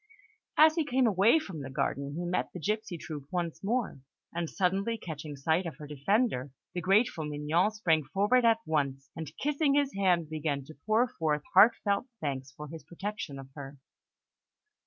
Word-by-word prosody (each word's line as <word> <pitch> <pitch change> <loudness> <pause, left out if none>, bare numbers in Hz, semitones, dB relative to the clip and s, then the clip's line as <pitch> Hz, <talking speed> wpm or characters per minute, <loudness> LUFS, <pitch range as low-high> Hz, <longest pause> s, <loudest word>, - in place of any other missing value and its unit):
As 310 +1 +8
he 325 -1 +1
came 265 -3 +2
away 210 - +5
from 190 - -5
the 135 - -6
garden, 140 +1 -2
he 175 +2 -3
met 180 +1 -1
the 180 - -6
gipsy 210 +1 -2
troupe 150 -4 -7
once 175 -2 -3
more; 220 - -1 0.3
and 170 -1 -2
suddenly 195 +4 0
catching 155 -6 -7
sight 160 +6 +1
of 165 - -6
her 150 - -8
defender, 150 - 0 0.2
the 175 - -2
grateful 195 -3 +2
Mignon 150 +5 +1
sprang 165 -9 +1
forward 205 - +2
at 230 -1 +5
once, 140 -3 -1
and 160 -1 -6
kissing 290 0 +1
his 285 -1 +2
hand, 180 -4 +2
began 150 -2 -2
to 155 +1 -13
pour 225 +3 +4
forth 155 -10 -1
heart 210 +5 +8
felt 200 +4 0
thanks 135 -3 -3
for 150 +2 -9
his 160 +2 -9
protection 185 -5 -5
of 135 -1 -10
her. 140 -1 -9
170 Hz, 180 wpm, -30 LUFS, 150-215 Hz, 0.3 s, As